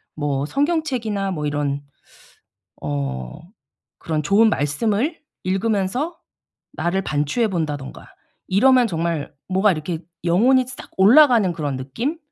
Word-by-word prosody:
뭐 145 -2 -1
성경책이나 255 - -1
뭐 150 -5 -3
이런 145 -1 -2 1.0
어 65 -4 -4 0.6
그런 155 -2 -2
좋은 200 +8 +4
말씀을 215 - 0 0.2
읽으면서 205 - -1 0.5
나를 180 +3 -1
반추해 155 - 0
본다든가 150 -7 -4 0.4
이러면 250 +5 +5
정말 165 -4 -2
뭐가 190 +2 +3
이렇게 160 0 -4 0.2
영혼이 240 +10 +4
싹 255 0 -10
올라가는 230 -2 +6
그런 145 -5 -3
느낌? 230 - -3
185 Hz, 255 characters per minute, -21 LUFS, 150-230 Hz, 1.0 s, 올라가는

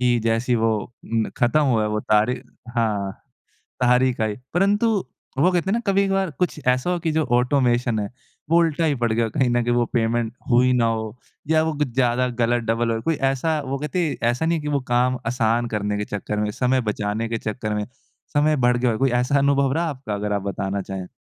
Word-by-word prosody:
कि 125 -1 +3
जैसे 115 +2 +1
वो 115 0 +2 0.3
न 115 -1 -1
ख़त्म 125 +5 +3
हुआ 120 -6 +2
है 105 - 0
वो 105 0 -1
तारीख 110 +4 +1 0.3
हाँ 105 -4 0 0.7
तारीख 125 0 +3
आई। 110 -1 0 0.2
परंतु 200 +5 +2 0.5
वो 175 +7 +4
कहते 180 +1 0
है - - +2
ना 230 - +1
कभी-कभार 195 -1 +2
कुछ 180 -3 0
ऐसा 130 +6 +2
हो 180 -1 0
कि 165 -1 -1
जो 160 0 +1
ऑटोमेशन 125 -3 +1
है 100 -1 -3 0.4
वो 165 - +4
उल्टा 165 -1 +1
ही 150 -3 +1
पड़ 120 -2 0
गया 115 +1 +1
कहीं 125 +3 +1
न 120 0 +1
कहीं 120 +1 +1
वो 120 0 +2
पेमेंट 115 -1 +1 0.2
हुई 125 +1 +4
ना 120 -2 +3
हो 110 -1 -2 0.3
या 160 0 +4
वो 160 0 -1
कुछ 150 -1 +1
ज़्यादा 125 0 +2
गलत 120 +1 +2
डबल 115 +1 0
हो। 115 0 -2
कोई 165 +6 0 0.2
ऐसा 155 +4 -1
वो 135 +1 -2
कहते 150 +4 -1
हैं - - -2
ऐसा 125 +6 -1
नहीं 165 +1 +1
है - - -5
कि 150 - -5
वो 145 -1 +1
काम 125 +1 +2
आसान 120 0 +1
करने 105 0 -1
के 105 - -2
चक्कर 105 +1 -3
में 105 0 0
समय 125 +4 +1
बचाने 105 0 -2
के 115 - -1
चक्कर 110 0 -3
में, 105 0 -2 0.5
समय 150 +1 +3
बढ़ 125 -3 +2
गया 125 0 +1
हो 110 - -2
कोई 135 +1 +2
ऐसा 135 +3 +1
अनुभव 140 -1 +2
रहा 165 +3 0
आपका 130 -7 -5
अगर 105 0 -2
आप 100 - -1
बताना 100 0 -3
चाहें? 95 -1 -6
120 Hz, 225 wpm, -22 LUFS, 110-145 Hz, 0.7 s, वो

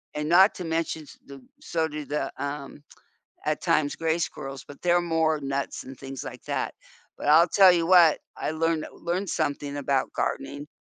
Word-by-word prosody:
and 150 0 -2
not 190 +4 +6
to 180 - -6
mention 160 -1 -2
s - - -15
the 140 -1 -11 0.2
so 160 -1 -1
do 150 -1 -6
the, 150 -1 -2 0.2
um, 140 0 -7 0.6
at - - 0
times, 145 -2 +1
gray 165 0 0
squirrels, 135 -5 -5
but 145 - -12
they're 175 0 +3 0.2
more 160 -1 +2
nuts 140 0 -3
and 130 -1 -10
things 135 -1 -7
like - - -9
that, - - -2 0.5
but - - -6
I'll 165 +3 +7
tell 190 0 +7
you 170 -1 +1
what 175 -3 +6 0.2
I - - -2
learned 160 0 0
learned 180 +3 -3
something 145 0 -2
about 135 -1 0
gardening 145 +2 -3
155 Hz, 185 wpm, -26 LUFS, 140-165 Hz, 0.6 s, I'll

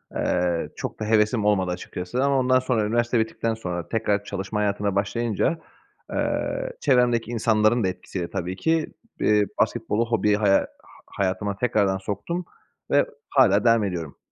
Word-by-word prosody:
eee, 90 -2 0
çok - - -6
da 110 - -3
hevesim 105 0 +2
olmadı 95 -4 +2
açıkçası 90 +7 -3
ama 140 -1 +3
ondan 130 0 +3
sonra, 120 -5 0
üniversite 120 +2 +1
bittikten 110 0 -1
sonra 90 -6 -5
tekrar 105 -3 0
çalışma 100 +1 -4
hayatına 100 -1 0
başlayınca, 115 - 0 0.5
eee, - - -2
çevremdeki 120 -2 +2
insanların 110 0 +2
da 95 - +2
etkisiyle 90 -1 -5
tabii 90 -1 -3
ki. 160 +7 0 0.3
Eee, 105 -1 +3 0.2
basketbolu, 115 +3 0
hobiyi, 105 -2 +2
ha, 100 -2 +3 0.4
hayatıma 100 +1 -2
tekrardan 100 -5 +1
soktum 105 - -4 0.5
ve 145 - +4 0.2
hâlâ 105 -7 +4
devam 115 -2 +5
ediyorum. 85 -7 -4
105 Hz, 145 wpm, -24 LUFS, 100-120 Hz, 0.5 s, devam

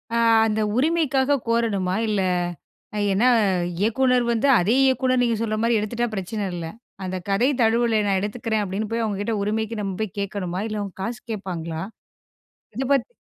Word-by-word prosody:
அ - - +2 0.3
அந்த 220 0 0 0.2
உரிமைக்காக 285 -2 +2
கோரணுமா 210 -6 +1
இல்ல. 210 -2 +1 0.9
ஏன்னா 215 +6 +3 0.5
இயக்குநர் 245 +4 +2
வந்து 235 +4 +1
அதே 200 +7 +2
இயக்குநர், 260 -1 +2
நீங்க 235 -1 +1
சொல்ற 215 -1 -1
மாரி 230 0 +3
எடுத்துட்டா 235 +3 -1
பிரச்சனை 205 +1 -3
இல்ல. 170 -2 -4 0.4
அந்த 185 0 -3
கதை 215 +8 +3
தழுவுல 225 0 +3
நான் 195 -1 +2
எடுத்துக்கிறேன், 215 +1 -2
அப்படின்னு 205 +2 -3
போய் 230 0 0
அவங்க 210 -3 -2
கிட்ட 225 +2 -1
உரிமைக்கு 220 +2 -2
நம்ம 195 -2 -3
போய் 215 -4 -4
கேட்கணுமா 195 -2 -3
இல்ல. 215 -1 -3
அவங்க 200 -2 -6
காசு 230 +1 -4
கேட்பாங்களா, 170 -5 -4 0.9
இதை 260 - -2
பத்தி 275 - +1
220 Hz, 160 wpm, -23 LUFS, 195-235 Hz, 0.9 s, ஏன்னா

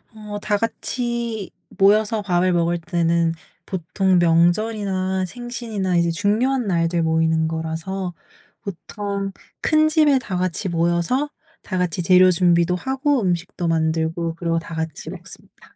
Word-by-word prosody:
어 210 -1 -7
다 210 -1 +1
같이 235 -2 -3 0.3
모여서 210 +2 +4
밥을 180 -2 +1
먹을 170 0 +1
때는 170 0 +1 0.3
보통 185 +1 0
명절이나 185 +2 +1
생신이나 225 -4 -3
이제 170 0 +2
중요한 220 +7 +1
날들 170 -1 +1
모이는 160 0 +2
거라서 165 +3 -4 0.5
보통 200 +1 -5 0.3
큰 310 0 +3
집에 305 -4 +4
다 195 -7 -4
같이 185 +1 -1
모여서 170 - +1 0.3
다 185 - -3
같이 180 0 -1
재료 185 +1 +6
준비도 170 0 +3
하고 265 - 0
음식도 175 -2 -2
만들고 165 +1 0
그러고 165 -1 -1
다 165 - -9
같이 160 -2 -4
먹습니다. - - -12
185 Hz, 280 characters per minute, -21 LUFS, 170-210 Hz, 0.5 s, 재료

